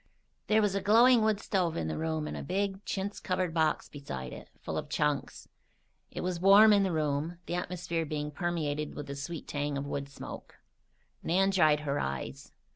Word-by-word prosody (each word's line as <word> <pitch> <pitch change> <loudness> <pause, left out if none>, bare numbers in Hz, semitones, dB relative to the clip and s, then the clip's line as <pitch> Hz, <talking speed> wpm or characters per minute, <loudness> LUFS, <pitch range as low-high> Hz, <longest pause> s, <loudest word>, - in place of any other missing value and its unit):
There 215 0 +4
was 205 -2 +2
a 200 - 0
glowing 235 +3 +6
wood 215 -2 +2
stove 185 -6 0
in 80 - -2
the 80 - -2
room 160 -1 -2
and - - -5
a - - -5
big, 195 +1 -2
chintz 200 +1 -3
covered 185 -2 -1
box 160 -2 +1
beside 65 - -7
it, - - -10
full - - -5
of - - -4
"chunks." 150 -1 -1 0.6
It - - -6
was 180 -1 -2
warm 200 +4 +8
in 200 - +5
the 190 -2 +1
room, 155 +1 -1
the - - -4
atmosphere 175 -1 -2
being 150 -1 -3
permeated 150 -2 -2
with 145 - -5
the 140 - -6
sweet 150 +4 -6
tang 145 -1 -2
of 140 - -3
wood 140 -1 -4
smoke. 140 - -9 0.7
Nan 195 +3 +2
dried 155 -5 +4
her 145 -1 -1
eyes. 70 0 -4
165 Hz, 195 wpm, -30 LUFS, 145-195 Hz, 0.7 s, warm